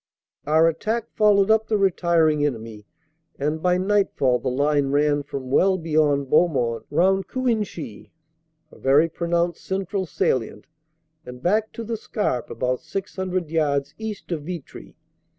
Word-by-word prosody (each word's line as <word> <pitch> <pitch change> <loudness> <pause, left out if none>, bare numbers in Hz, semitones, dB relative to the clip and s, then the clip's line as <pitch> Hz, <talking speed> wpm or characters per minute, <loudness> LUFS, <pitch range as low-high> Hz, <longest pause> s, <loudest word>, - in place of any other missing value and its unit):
"Our 160 +2 +4
attack 220 +8 -2
followed 205 -1 +4
up 220 0 +3
the 215 - +1
retiring 170 -5 +2
enemy, 115 -6 -4 0.5
and 150 +3 -2
by 180 +1 +2
night 200 +2 +2
fall 125 -2 +2
the 120 - -2
line 145 +2 +1
ran 145 +1 +2
from 135 -2 -7
well 190 +6 +3
beyond 155 -4 +1
Beaumont, 125 -8 +1
round 190 +5 +2
Cuinchy 215 - -3 0.6
(a - - -16
very 140 +5 +4
pronounced 170 +1 -1
central 190 0 -3
salient), 115 -7 -1 0.6
and 125 -2 -10
back 215 +4 +1
to 230 - -6
the 225 0 -3
Scarpe 205 - -2
about 125 +2 -2
600 185 -3 -4
yards 145 -3 0
east 220 -4 -6
of 165 -3 -2
Vitry. 170 -1 -9
165 Hz, 140 wpm, -23 LUFS, 140-195 Hz, 0.6 s, Our